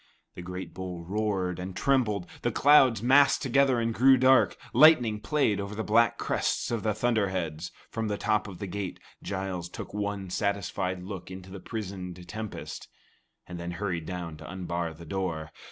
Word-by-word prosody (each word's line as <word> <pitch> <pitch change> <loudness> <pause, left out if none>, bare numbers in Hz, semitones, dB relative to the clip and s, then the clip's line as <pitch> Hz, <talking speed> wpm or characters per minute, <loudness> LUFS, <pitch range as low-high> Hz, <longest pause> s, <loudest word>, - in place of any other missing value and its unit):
The - - -8
great 90 +1 -7
bowl 90 -2 -6
roared 95 -3 -1
and 90 0 -6
trembled, 115 -7 +1 0.2
the - - 0
clouds 130 -6 +5
massed 140 +3 +5
together 135 -1 +3
and 115 0 0
grew 130 +3 +6
dark; 130 -8 +4 0.2
lightning 125 -6 +6
played 110 -3 +1
over 100 +1 -5
the 110 - -2
black 115 +1 +3
crests - - -1
of 115 -2 -1
the 110 -2 0
thunder 110 -3 +1
heads. 85 -3 -4 0.2
From 110 -1 -2
the 105 -1 -1
top 105 0 0
of 95 -3 -8
the 100 - -5
gate, 95 0 -5 0.2
Giles 95 -3 -4
took - - -8
one 100 -2 -3
satisfied 95 -2 -1
look 95 -2 -7
into 95 0 -9
the 100 - -7
prisoned 90 -4 -6
tempest, 110 +3 -6 0.6
and 90 -1 -8
then 85 +1 -4
hurried 85 -3 -3
down 85 -4 -5
to 80 - -10
unbar 85 -3 -3
the 85 +1 -11
door. 80 -3 -3
100 Hz, 175 wpm, -28 LUFS, 90-110 Hz, 0.6 s, grew